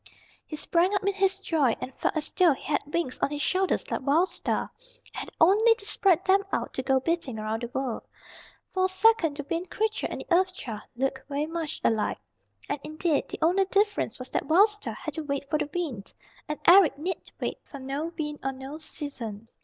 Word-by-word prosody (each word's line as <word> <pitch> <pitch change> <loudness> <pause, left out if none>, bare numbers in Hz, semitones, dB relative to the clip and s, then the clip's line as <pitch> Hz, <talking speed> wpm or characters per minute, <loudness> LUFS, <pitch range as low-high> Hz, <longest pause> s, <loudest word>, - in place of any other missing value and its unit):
He 310 - -5
sprang 345 +6 +2
up 400 - 0
in 400 +1 +1
his 390 0 +1
joy, 305 - +2
and 260 - -6
felt - - -1
as 300 - -2
though 355 -5 +5
he - - -11
had 290 - 0
wings 335 -6 -1
on - - +1
his 295 0 -2
shoulders 380 0 0
like - - -1
Wild 310 +8 +3
Star, - - -2 0.3
and - - -21
had - - -5
only 430 +7 +6
to 405 - -8
spread 385 -3 +3
them 390 +1 +4
out - - -2
to - - -2
go 265 0 +2
beating 290 -5 -1
around 215 +1 -2
the 240 - -3
world. 250 -1 -3 0.7
For 375 -1 +2
a - - +1
second 375 -6 +3
the 290 - -5
Wind 340 +2 -2
Creature 435 0 -1
and - - -5
the - - -11
Earth 370 +1 +2
Child 225 - -6
looked 265 +1 -2
very 285 +1 -1
much 325 -1 -4
alike. 220 -2 +1 0.5
And - - -2
indeed, 310 0 -1
the - - -5
only 370 +4 +4
difference 400 - +1
was 255 0 -7
that - - -1
Wild 385 +7 +6
Star 420 0 -5
had - - -6
to 320 - -3
wait 280 -1 -3
for 305 - +2
the 290 - -2
wind, 290 - -4 0.3
and 300 - -3
Eric 350 -5 +7
need 345 +4 -4
wait - - -3
for 280 - -10
no 275 +5 -3
wind 295 -2 -3
or 270 0 -1
no 265 +4 -8
season. 230 -9 -7
315 Hz, 215 wpm, -27 LUFS, 270-375 Hz, 0.7 s, Eric